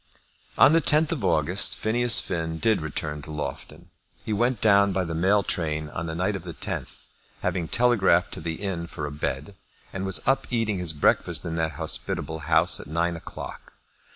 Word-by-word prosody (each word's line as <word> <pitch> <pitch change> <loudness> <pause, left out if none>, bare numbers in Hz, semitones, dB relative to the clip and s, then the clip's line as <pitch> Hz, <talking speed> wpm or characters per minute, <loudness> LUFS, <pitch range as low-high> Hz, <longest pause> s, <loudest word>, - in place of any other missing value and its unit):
On 145 - +7
the 165 - +4
10th 155 0 +3
of 150 -10 -3
August, 90 +2 +2
Phineas 120 +1 +2
Finn 80 -1 -3
did 110 +2 +1
return 75 -1 -4
to 75 - -12
Loughton. 75 +3 -6 0.3
He 110 - -1
went 120 +2 +1
down 100 -2 +4
by 95 0 0
the 80 -2 -4
mail 95 +5 +2
train 75 -4 -2
on 80 +2 -5
the 80 - -4
night 95 +4 0
of 95 - -5
the 85 -2 -8
10th, - - -4 0.4
having 85 -3 -1
telegraphed 100 -6 +3
to - - -7
the 80 -1 -3
inn 90 -3 -4
for 75 - -6
a 75 - -5
bed, 75 +4 -4 0.4
and 95 - -4
was 95 -1 +1
up 135 0 +2
eating 115 -5 0
his 85 -3 0
breakfast 75 - +1
in 85 - -3
that 80 -1 -1
hospitable 80 +3 -2
house - - +4
at - - -9
nine 85 +3 0
o'clock. 80 - -9
90 Hz, 190 wpm, -25 LUFS, 80-105 Hz, 0.4 s, On